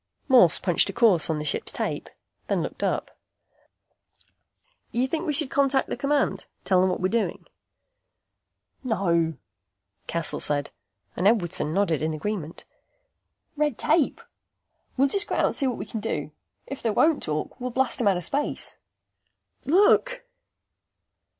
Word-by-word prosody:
Morse 240 - +6
punched 175 -3 +2
a - - -4
course 220 -11 +3
on 160 - 0
the 150 - -4
ship's - - 0
tape, - - -4 0.4
then - - 0
looked - - -6
up. - - -2 1.8
"You 245 +2 0
think 325 +5 -3
we 300 - +1
should 285 -2 -1
contact 275 -1 +2
the - - -2
command? 285 -1 0 0.2
Tell 185 -2 +3
them 185 - +3
what 180 - -2
we're 185 - +1
doing?" 230 +3 -2 1.4
"No!" 170 - +1 0.7
Cassel 170 -2 +1
said, 145 -1 0 0.4
and 180 - +2
Edwardson 175 -8 +1
nodded 170 -5 +1
in 155 0 -1
agreement. 170 -1 -5 0.9
"Red 295 -4 0
tape. 315 - +1 0.8
We'll 275 +2 +4
just 400 +8 -2
go - - -2
out - - +2
and - - -1
see 275 - 0
what 245 - -2
we 195 - -5
can 220 - -5
do. 155 -9 -3 0.3
If 275 - -7
they 230 - 0
won't 305 +8 +3
talk, 155 - -4
we'll 250 - -2
blast 250 0 -1
'em 225 - +2
out 195 -2 +3
of 175 - -5
space." 290 +1 -3 0.9
"Look!" 480 - +3
225 Hz, 150 wpm, -25 LUFS, 170-275 Hz, 1.8 s, Morse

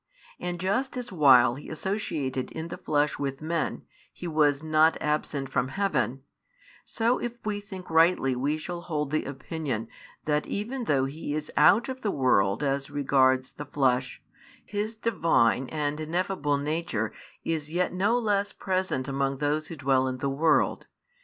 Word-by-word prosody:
And 175 0 -4
just 255 +9 -1
as 245 -2 -5
while 130 -8 +6
He 140 +4 -9
associated 150 -7 -3
in 160 +1 -5
the - - -6
flesh 150 0 0
with 135 -1 -3
men, 165 +1 -2 0.3
He 175 - -7
was 150 -2 +2
not 155 +1 +4
absent 150 -2 -1
from 125 -1 0
heaven, 135 - -1 0.6
so 235 +2 0
if 240 -1 -3
we 210 -1 -1
think 195 -3 -9
rightly 160 -5 +3
we 140 +5 0
shall 170 +2 -5
hold 150 -4 -3
the 155 - 0
opinion 135 -4 -4 0.4
that 150 0 0
even 235 +5 -3
though 135 -7 +2
He 145 +1 -4
is 155 0 -4
out 225 +10 +5
of 260 0 -5
the 210 - 0
world 125 - +2
as 135 -1 -1
regards 130 -2 +2
the 145 - -8
flesh, 130 -3 0 0.4
His 210 +2 -3
Divine 165 - +2
and 150 -1 -2
ineffable 160 -2 -1
Nature 145 -7 -2 0.3
is 155 -2 -2
yet 180 +2 0
no 205 +6 +2
less 205 -3 0
present 185 -8 -1
among 135 0 -1
those 150 +2 0
who 165 - -7
dwell 135 -2 +2
in 130 0 -3
the 135 +2 -1
world. 155 +4 +2
150 Hz, 160 wpm, -27 LUFS, 135-180 Hz, 0.6 s, while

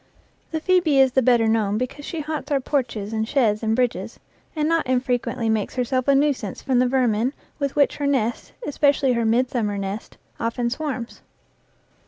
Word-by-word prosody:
The 320 - -2
phoebe 340 -5 +3
is 265 -1 +5
the 265 - +3
better 235 -2 +4
known 215 -2 +1
because 255 +4 -4
she 330 - -4
haunts 305 0 -5
our 285 -2 +2
porches 230 -6 -2
and 220 0 -1
sheds 225 -6 +2
and 220 -1 +1
bridges, 250 -1 -1 0.4
and 305 -1 0
not 330 -3 +1
infrequently 250 -2 0
makes 220 -2 -1
herself 255 +1 -1
a 280 - +5
nuisance 275 -8 0
from 255 -2 +1
the 250 - +3
vermin 245 -1 +1 0.3
with 280 -2 -2
which 285 -2 +3
her 285 - -1
nest, 240 -4 -1
especially 285 -2 +2
her 235 -1 0
midsummer 230 -2 +1
nest, 200 +2 -5 0.2
often 235 +1 -1
swarms. 255 -4 -4
255 Hz, 175 wpm, -23 LUFS, 225-280 Hz, 0.4 s, is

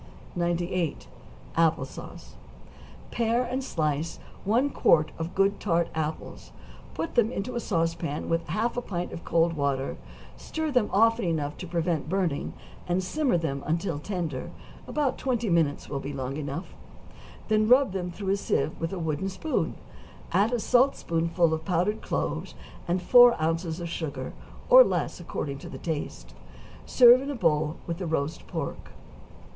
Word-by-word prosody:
98. 175 -1 -1 0.5
=Apple 165 -1 +3
Sauce.= - - -11 0.8
Pare 235 +1 +1
and 255 +2 -3
slice 155 - -1 0.3
one 245 +8 +2
quart 155 -9 +3
of 165 +2 -4
good 195 +1 +2
tart 170 -4 +1
apples; 160 0 -4 0.4
put 330 - -3
them 235 -3 +3
into 250 +2 -4
a 240 - -1
sauce 165 -7 0
pan 160 -3 -4
with 165 0 -1
half 215 +10 -1
a 245 - -1
pint 180 -6 -4
of 165 - -7
cold 165 0 +2
water; 140 -3 -1 0.4
stir 315 -1 -3
them 250 -6 +2
often 225 +1 +3
enough 150 -3 -1
to 180 - -7
prevent 165 -3 -1
burning, 180 -6 -1 0.3
and 180 +1 +1
simmer 265 - +1
them 140 -4 -2
until 165 -1 -1
tender, 165 -6 -4 0.4
about 290 -3 -1
twenty 240 -6 0
minutes 160 -4 +1
will 140 - -3
be 140 +1 -5
long 135 0 -4
enough; 150 +4 -5 0.7
then 215 -1 +3
rub 260 -2 +6
them 180 -2 -3
through 190 +2 -5
a - - +1
sieve 150 -6 0
with 165 - -2
a 195 - -4
wooden 160 +3 -2
spoon, 250 +12 -2 0.6
add 210 +4 +3
a 245 - 0
saltspoonful 170 - +2
of 160 0 -2
powdered 185 +5 0
cloves, - - -3 0.3
and 180 +1 0
four 245 +2 +7
ounces 165 +1 -1
of 170 - -4
sugar, 160 -3 -4 0.3
or - - +10
less - - -2
according 140 -2 -4
to - - -9
the - - -7
taste; 160 -3 -5 0.5
serve 245 0 +7
in 275 - -5
a 285 - -2
bowl, 155 -6 +1
with 170 0 -4
the 180 - -3
roast 155 0 -2
pork. 160 -5 -5
175 Hz, 160 wpm, -27 LUFS, 160-215 Hz, 0.8 s, or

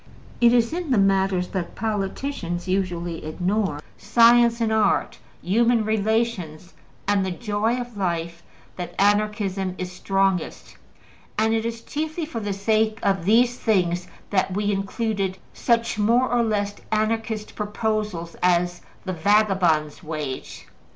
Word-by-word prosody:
It 235 -1 +7
is 235 +2 +3
in 345 -2 -3
the 255 - +3
matters 195 -2 +2
that 185 -3 -4
politicians 195 -3 -3
usually 175 -3 -2
ignore 180 0 -1 0.2
science 235 0 +5
and 225 -1 +1
art, 220 -1 +1 0.2
human 230 +4 +2
relations, 215 -6 -1 0.3
and 200 -1 +2
the 190 - -1
joy 215 +4 -1
of 240 -2 -7
life 170 -3 -2 0.4
that 180 -1 -6
Anarchism 205 -2 +1
is 185 0 -4
strongest, 195 -1 -1 0.6
and 220 +1 +2
it 225 0 0
is 230 0 -6
chiefly 315 +2 -3
for 270 -7 -5
the 205 -2 -3
sake 215 +2 +1
of 195 -3 +1
these 240 +4 +3
things 180 -5 +1 0.2
that 190 -1 +1
we 205 0 0
included 195 -1 -2 0.2
such 230 -2 0
more 235 +5 +3
or 245 -1 +3
less 205 -3 -1
Anarchist 220 0 -1
proposals 210 -5 -2
as 175 0 +2 0.2
the 185 - -2
``vagabond's 185 -5 +2
wage.'' 150 -5 -6
205 Hz, 130 wpm, -23 LUFS, 185-225 Hz, 0.6 s, It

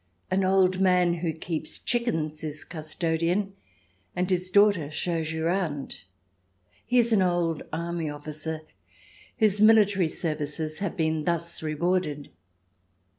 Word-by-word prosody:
An 190 +1 +2
old 185 -1 +3
man 180 -2 +4
who 170 -1 -1
keeps 160 0 -5
chickens 160 -11 -1
is 150 -1 -5
custodian, 170 +4 -1 0.6
and 180 +1 -1
his 180 0 0
daughter 200 -6 +4
shows 160 0 -2
you 160 0 -2
round. 165 - -2 0.8
He 250 - +2
is 235 -1 +4
an 205 - +4
old 175 -3 +1
army 170 0 -3
officer, 155 +2 -5 0.8
whose 210 -2 +3
military 205 -4 +5
services 155 -1 -3
have 200 0 -3
been 160 -2 0
thus 170 0 -2
rewarded. 155 -1 -1
170 Hz, 125 wpm, -27 LUFS, 155-185 Hz, 0.8 s, military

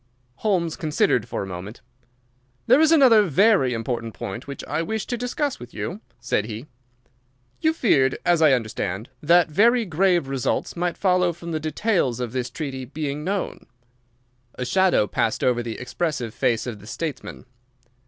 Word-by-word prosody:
Holmes 175 -7 0
considered 155 - +1
for - - -3
a - - -5
moment. 95 +4 -8 0.8
"There 285 - +5
is 320 0 +5
another 260 -9 +7
very 190 - +3
important 115 -1 -3
point 100 +8 -6
which 140 - -7
I 150 +3 -2
wish 220 +4 -3
to 245 - -3
discuss 250 +4 -2
with 120 0 -11
you," 165 - -5 0.2
said 105 - -1
he. 110 +3 -7 0.9
"You 315 - +3
feared, 140 - +2
as 175 -2 +3
I 155 -4 +6
understand, 110 -2 -2
that 170 +1 +4
very 230 +7 +4
grave 175 -3 +2
results 135 -2 -2
might 175 0 -2
follow 180 -2 +2
from 170 0 -8
the 160 - -1
details 155 - 0
of 125 -3 -3
this 125 -1 -3
treaty 135 -1 -5
becoming 145 +2 -4
known." 195 +3 -3 0.9
A 125 - -4
shadow 190 - +3
passed 110 +2 -1
over 125 -1 +2
the 115 -2 -5
expressive 125 -3 -3
face 120 -4 0
of 115 -4 -6
the 105 - -14
statesman. 145 0 -6
150 Hz, 165 wpm, -23 LUFS, 120-190 Hz, 0.9 s, another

